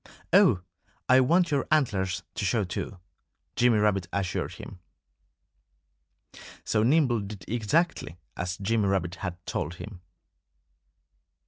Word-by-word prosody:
"Oh! 90 - +6 0.5
I 130 +1 +6
want 170 +6 +3
your 140 -2 0
antlers 95 - +1
to - - -4
show 105 +3 +1
too," 95 +1 -5 0.6
Jimmy 120 -2 +4
Rabbit 100 -4 +1
assured 95 -3 -2
him. 95 - -10 1.8
So 105 - +1
Nimble 125 -1 +3
did 100 0 -8
exactly 120 - 0 0.2
as 90 +2 -3
Jimmy 105 +1 0
Rabbit 90 -3 0
had 90 -3 -4
told 85 +4 -3
him. 95 0 -10
105 Hz, 115 wpm, -27 LUFS, 95-125 Hz, 1.8 s, Oh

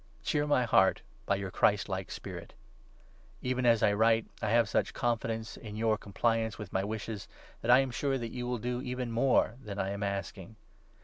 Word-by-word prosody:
Cheer 150 0 0
my 145 -4 +3
heart 95 -4 +4 0.2
by 100 - +3
your 95 -1 -4
Christlike 100 -2 +1
spirit. - - -8 0.9
Even 130 -1 0
as 115 -2 +4
I 105 -2 +4
write, 110 +2 +3 0.2
I 110 - 0
have 115 +1 +4
such - - 0
confidence 115 -2 -2
in 105 -2 -8
your 110 0 +2
compliance 110 +2 0
21 105 - -6
with 95 - -13
my 95 - +1
wishes, 105 -1 -5 0.3
that 115 - -4
I 125 +2 +8
am 135 -2 -2
sure 135 +2 0
that 115 -3 -5
you 125 -1 -4
will 125 0 -1
do 125 +2 -3
even 125 -2 -3
more 120 -1 +2
than 100 -3 -6
I 95 -1 -1
am 100 +1 -5
asking. 100 0 -4
115 Hz, 195 wpm, -31 LUFS, 100-125 Hz, 0.9 s, I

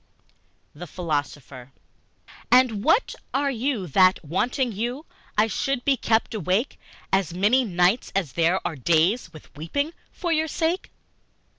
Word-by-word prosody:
The 175 +4 -9
Philosopher 145 -6 -5 0.8
AND 245 -5 +4
what 370 - +3 0.2
are 280 0 +1
you 245 -4 -2
that, 185 +2 +3
wanting 240 - -1
you, 240 +8 -4 0.3
I 210 - +5
should 245 +4 -2
be 280 - +4
kept 225 -2 0
awake 205 - -1 0.3
As 185 -3 +1
many 215 +8 +3
nights 185 +2 +1
as 180 -8 0
there 170 +5 +2
are 175 - -2
days 170 - +1
With 155 -3 -15
weeping 285 - -3 0.2
for 350 -3 -3
your 315 0 +1
sake? 330 +4 -1
205 Hz, 135 wpm, -24 LUFS, 170-260 Hz, 0.8 s, I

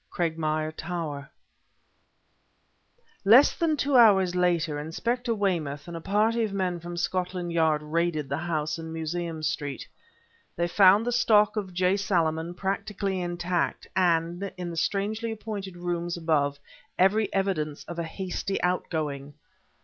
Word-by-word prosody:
CRAGMIRE 155 -2 -1
TOWER 155 -4 -5 1.9
Less 235 +8 +7
than 320 -2 +1
two 280 -1 0
hours 195 -7 +6
later, 170 -4 +1
Inspector 235 - -2
Weymouth 165 -8 -1
and 170 - -7
a 165 - -6
party 215 +5 +1
of 215 - -2
men 185 -3 -1
from 175 +1 -7
Scotland 180 0 -2
Yard 160 -2 +2
raided 155 -1 -1
the 140 +3 -2
house 160 -2 -2
in 160 0 -7
Museum 165 0 -4
Street. 145 -2 -3 0.7
They 170 +1 0
found 195 +4 +5
the 245 - 0
stock 215 -3 +4
of 200 -3 -3
J. 185 +2 +2
Salaman 170 -3 0
practically 195 0 -2
intact, 175 0 -2
and, 175 +1 +1
in 175 -1 -4
the - - -6
strangely 210 +6 -1
appointed 205 -4 -6
rooms 175 0 -3
above, 150 -4 +1 0.4
every 205 +4 +3
evidence 165 -7 -1
of 170 0 -7
a - - -1
hasty 190 +3 -3
outgoing. 150 -6 -2
175 Hz, 135 wpm, -27 LUFS, 160-195 Hz, 1.9 s, Less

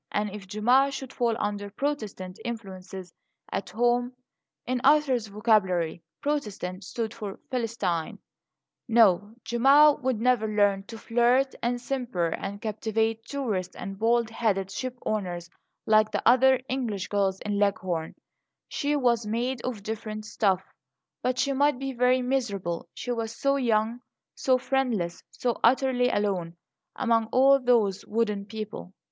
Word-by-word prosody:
And 210 0 -1
if 200 -1 -9
Gemma 245 +7 +3
should 270 -1 -7
fall 235 -2 +1
under 205 -1 -3
"Protestant" 205 -7 -4
influences 190 -6 -7 0.4
at 195 -1 -3
home 240 +4 +1 0.5
(in 250 0 -1
Arthur's 270 -6 +4
vocabulary 195 -6 +1 0.2
"Protestant" 210 -10 -3
stood 225 +3 -4
for 210 -4 -7
"Philistine") 230 -9 -2 0.7
No, 215 -2 +4
Gemma 280 +5 +6
would 255 -4 0
never 240 -2 +2
learn 205 -2 +2
to 225 - -9
flirt 245 +4 +2
and 245 +1 0
simper 240 -10 -2
and 195 +4 -5
captivate 220 +1 -1
tourists 215 -10 -3
and 195 0 -7
bald 230 0 +2
headed 195 -4 0
shipowners, 205 -9 -4 0.3
like 215 0 +4
the 205 -1 -1
other 260 +2 +6
English 230 -8 -2
girls 195 -2 0
in 205 -1 -2
Leghorn; 185 -5 -1 0.5
she 290 0 -1
was 235 -5 +1
made 240 +3 -1
of 235 -5 -4
different 215 0 -5
stuff. 195 -3 +1 0.6
But 255 0 0
she 275 +1 +1
might 285 0 +2
be 270 0 -4
very 250 +1 +3
miserable; 205 -10 -2
she 245 - -4
was 230 -1 -3
so 275 +3 +1
young, 230 -3 +1 0.3
so 255 -1 +2
friendless, 245 -10 -1
so 245 -2 -2
utterly 250 0 +3
alone 185 -6 -1 0.4
among 230 -3 +1
all 270 +3 +5
those 230 -7 +2
wooden 210 -2 -1
people. 215 -3 -7
225 Hz, 135 wpm, -27 LUFS, 200-250 Hz, 0.7 s, Gemma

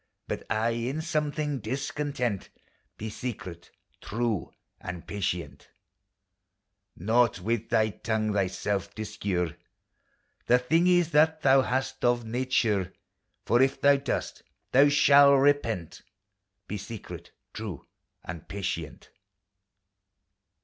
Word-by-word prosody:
But - - -4
aye 110 +3 +1 0.2
in 145 +4 -3
some 155 -3 0
thing 150 -3 -2
discontent: 130 -2 -3 0.5
Be 110 - -5
secret, 95 -8 -7 0.3
true 110 -4 -2 0.3
and 90 -2 -7
patient! 85 -8 -4 1.3
Nought 115 +3 +2
with 115 +4 -2
thy 110 -2 +3
tongue 110 0 -1
thyself 100 0 -1
discure 100 -6 -2 0.9
The 125 - +6
thingis 170 +6 +3
that 155 +1 +4
thou 135 0 +6
hast 130 +1 -2
of 120 -1 +2
nature; 110 -6 0 0.5
For 120 +2 +3
if 135 +1 +2
thou 140 0 +5
dost, 140 - -3 0.3
thou 140 +3 +6
shalt 140 -1 +6
repent: 125 - +1 0.7
Be 105 - -4
secret, 105 +2 -8 0.2
true 105 -8 -6 0.4
and 85 -2 -7
patient! 100 -2 -5
115 Hz, 105 wpm, -28 LUFS, 100-140 Hz, 1.3 s, The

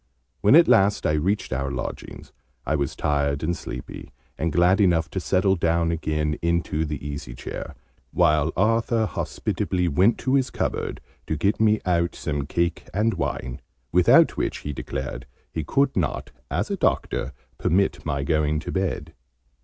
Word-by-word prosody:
When 105 +7 +5
at 170 +1 +7
last 105 -4 +4
I - - +3
reached 85 +3 0
our 70 +1 -1
lodgings 65 -3 -6 0.3
I - - +1
was 70 -2 -2
tired 70 0 0
and 85 +2 0
sleepy, 65 -5 -8 0.3
and 80 +4 -1
glad 90 +5 +4
enough 85 -4 +2
to 95 - -2
settle 95 +1 +2
down 85 -1 +1
again 75 -2 -1
into 85 -2 0
the 75 -1 -5
easy 70 -4 -6
chair, 65 - -7 0.4
while 75 -3 +3
Arthur 115 +2 +2
hospitably 90 -3 -2
went 95 +10 +3
to 130 - -1
his 135 -2 +2
cupboard, - - -3 0.3
to 80 - -1
get 100 +7 +1
me 110 -1 +3
out 85 -1 +1
some 75 -4 -3
cake 85 +2 -1
and 110 +2 +2
wine, 65 +1 -3 0.3
without 90 0 +5
which, - - -2
he 75 - -3
declared, 65 -1 -5 0.3
he 80 - -2
could 135 - +1
not, 85 -6 -2 0.2
as - - -2
a - - -1
doctor, - - 0 0.3
permit 95 +4 +1
my 70 0 -2
going 75 +1 +1
to - - -5
bed. 95 -1 -2
85 Hz, 160 wpm, -24 LUFS, 75-95 Hz, 0.4 s, at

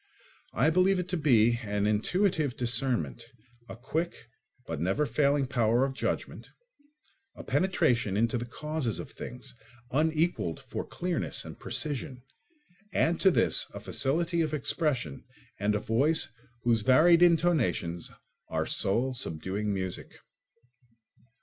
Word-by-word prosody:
I 135 +9 +3
believe 185 +3 +3
it 180 -1 -2
to - - -1
be 120 -7 +4
an 105 -2 -1
intuitive 150 - +1
discernment, 120 - 0 0.5
a - - -7
quick 155 +8 -4 0.4
but - - -4
never 95 - +1
failing 140 -1 +2
power 120 -1 +2
of 135 - -3
judgment, - - -3 0.9
a - - -9
penetration 135 - +1
into 115 +2 +1
the 120 - -5
causes 150 -4 -3
of - - -7
things, 125 +1 -8 0.4
unequalled 155 - 0
for - - -6
clearness 180 -2 -2
and - - -10
precision; 135 -4 -3 0.7
add 170 +1 +2
to 195 - +6
this 180 - +2
a - - -5
facility 170 +5 0
of 155 -1 0
expression 135 - -2 0.4
and 105 +1 +1
a - - +1
voice 135 +10 +1 0.3
whose 115 -2 +3
varied 160 +9 +5
intonations 155 - +2 0.4
are - - -1
soul 120 +7 0
subduing 100 0 -3
music. 95 -2 -4
130 Hz, 125 wpm, -29 LUFS, 110-160 Hz, 0.9 s, to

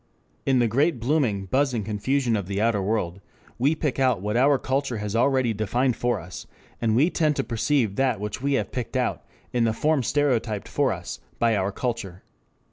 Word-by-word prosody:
In 135 -1 +4
the 120 -1 +3
great 140 +5 +1
blooming, 120 -6 +1
buzzing 130 +1 +1
confusion 115 +4 0
of 100 -4 -3
the 100 0 -2
outer 110 -2 +2
world 95 -3 -1 0.4
we 140 +6 +3
pick 150 -4 -2
out 130 -5 +3
what 105 +3 -2
our 135 +3 +4
culture 130 -1 -1
has 105 0 -4
already 130 -1 +2
defined 120 +4 0
for 120 0 0
us, 90 +2 -9 0.3
and 110 -2 +2
we 150 +9 +4
tend 155 -3 +1
to 135 - 0
perceive 115 -3 0
that 135 -6 +1
which 105 +4 -4
we 140 +1 0
have 135 - -1
picked 125 +1 -3
out 125 - -1 0.3
in 120 -1 +2
the 115 -1 +2
form 150 +4 +1
stereotyped 120 -6 0
for - - +1
us - - -6 0.2
by 115 -1 +2
our 100 0 0
culture. 110 -6 -4
120 Hz, 195 wpm, -25 LUFS, 105-135 Hz, 0.4 s, In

